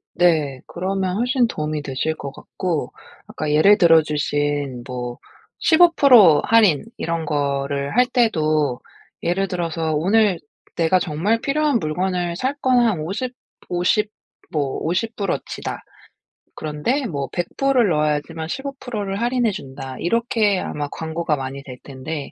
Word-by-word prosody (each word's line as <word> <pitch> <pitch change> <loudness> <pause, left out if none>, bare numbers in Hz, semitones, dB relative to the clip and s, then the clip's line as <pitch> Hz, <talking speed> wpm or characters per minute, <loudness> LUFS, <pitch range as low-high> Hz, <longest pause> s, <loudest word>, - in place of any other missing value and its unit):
네. 155 -7 +2
그러면 185 +1 -2
훨씬 245 0 +2
도움이 155 -5 -3
되실 145 +3 -2
것 140 -3 -7
같고 165 -2 -4 0.4
아까 155 -1 -4
예를 195 +8 +6
들어주신 145 -5 +2
뭐 125 -1 -5 0.4
15% 280 - +6
할인 215 -7 +4
이런 165 -1 -2
거를 140 +1 -1
할 250 - +6
때도 155 - +1 0.4
예를 195 +3 0
들어서 165 -3 -2
'오늘 195 +3 +3 0.4
내가 170 +2 +3
정말 185 +8 0
필요한 290 -3 +1
물건을 175 +2 -1
살 260 +8 -1
건 255 -1 +3
한 220 -9 +2
오십, 205 +11 -3 0.4
오십 185 +4 +1 0.4
뭐 145 -4 -1
$50 200 +4 -1
어치다. - - -4 0.8
그런데 160 - -2
뭐 140 -4 -3
$100 270 +10 -1
을 230 -5 +4
넣어야지만 155 +1 -1
15% 265 -2 -5
를 195 +1 -3
할인해 240 -1 +1
준다.' 135 -6 -8
이렇게 215 -1 +1
아마 145 -1 -4
광고가 160 0 -2
많이 135 0 -6
될 130 -2 -9
텐데 140 +2 -6
170 Hz, 240 characters per minute, -21 LUFS, 150-215 Hz, 0.8 s, 예를